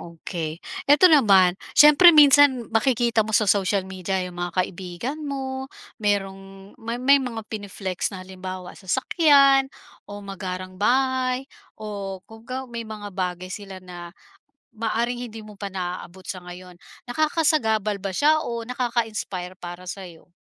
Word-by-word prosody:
okay. 165 -1 -6 0.3
Ito 320 +4 +7
naman, 195 -9 +5 0.2
siyempre 300 +4 +8
minsan 285 -6 +6
makikita 235 0 +2
mo 215 0 +1
sa 215 - +3
social 195 -1 +1
media 190 0 -4
'yong 180 - -7
mga 175 0 -4
kaibigan 190 - -6
mo, 265 -1 -4 0.3
merong 195 -1 -3
may 230 +1 -4
may 275 +3 +4
mga 230 -4 -5
pine-flex 195 -3 -4
na 185 -2 -9
halimbawa, 185 -1 -8
sasakyan 275 - +3 0.4
o 205 0 -9
magarang 185 -1 -7
bahay 255 +2 +1 0.3
o 200 -3 -6
kumbaga 230 +4 -7
may 235 -2 -7
mga 205 -2 -8
bagay 185 0 -4
sila 195 -2 -8
na, 180 -2 -10 0.7
maaaring 235 +2 -2
hindi 225 -1 -9
mo 210 -1 -13
pa 200 -1 -6
naabot 180 0 -6
sa 185 -2 -6
ngayon. 180 0 -11 0.3
Nakakasagabal 245 - +1
ba 195 0 -5
siya 310 +9 +3
o 235 -1 -4
nakaka-inspire 225 -7 -3
para 175 +1 -9
sa'yo? 180 -3 -10
205 Hz, 135 wpm, -23 LUFS, 185-255 Hz, 0.7 s, siyempre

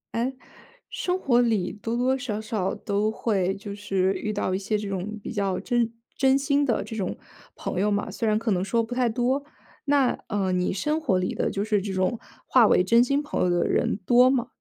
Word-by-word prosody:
诶， 240 +3 -1 0.6
生 425 -7 -2
活 245 -7 +3
里 220 -6 0
多 225 +3 -4
多 260 +2 +2
少 240 -5 -3
少 215 -4 -2
都 210 0 -1
会 195 -4 0
就 200 0 -7
是 195 -2 0
遇 215 - -3
到 190 -2 -1
一 - - +1
些 205 +2 -1
这 210 0 -5
种 195 +2 -4
比 - - -6
较 195 -3 -1
真 240 -2 0 0.2
真 265 0 +4
心 280 +1 +1
的 240 -5 +1
这 225 - -7
种 195 -4 -3 0.4
朋 180 - -4
友 210 +1 +2
嘛， 205 0 -1
虽 230 - -2
然 215 0 +2
可 225 0 -1
能 185 -2 +1
说 230 +4 +1
不 235 +2 -5
太 250 -1 +2
多。 250 +5 0 0.4
那， 280 -3 +2
呃， 200 -2 0
你 180 0 +1
生 300 +11 -1
活 205 -12 +1
里 185 - -2
的， - - 0
就 200 - -2
是 210 -1 +1
这 200 0 -4
种 185 +5 0 0.3
划 245 -4 +6
为 - - +4
真 230 +4 +5
心 275 +3 +1
朋 295 - -3
友 180 - +2
的 175 0 +1
人 - - +1
多 245 +4 +6
吗？ 260 -3 +1
220 Hz, 240 characters per minute, -25 LUFS, 195-250 Hz, 0.6 s, 划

